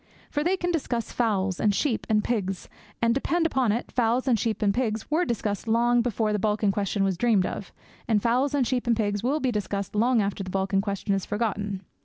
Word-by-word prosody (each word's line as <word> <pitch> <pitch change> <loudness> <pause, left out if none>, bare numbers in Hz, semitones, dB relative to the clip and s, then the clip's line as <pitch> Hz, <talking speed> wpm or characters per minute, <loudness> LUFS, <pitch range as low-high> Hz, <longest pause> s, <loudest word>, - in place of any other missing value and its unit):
For 295 - 0
they 365 +4 +1
can 355 -1 -1
discuss 250 -8 -2
fowls 195 -6 0
and 205 -2 +2
sheep 250 -3 -1
and 215 -1 +3
pigs; 195 -6 -2 0.4
and, 230 0 +4
depend 325 +6 0
upon 260 -8 +2
it, 235 +3 -3
fowls 245 +2 +1
and 235 -4 +3
sheep 220 0 -1
and 200 -1 +3
pigs 220 +1 -2
were 340 +4 +2
discussed 215 - -2
long 240 +2 +3
before 225 -2 0
the 210 - 0
Balkan 210 0 +1
question 200 0 -1
was 190 -2 0
dreamed 220 -6 +3
of, 200 - -5 0.4
and 220 -3 +3
fowls 250 +6 +1
and 270 -3 +2
sheep 250 0 -1
and 235 -2 +3
pigs 205 -2 0
will 270 +6 0
be 260 -4 0
discussed 200 -2 -3
long 235 +3 +3
after 200 -1 -1
the 185 - -7
Balkan 195 +1 0
question 200 0 -2
is 195 -1 0
forgotten. 205 -3 -2
220 Hz, 220 wpm, -26 LUFS, 200-245 Hz, 0.4 s, and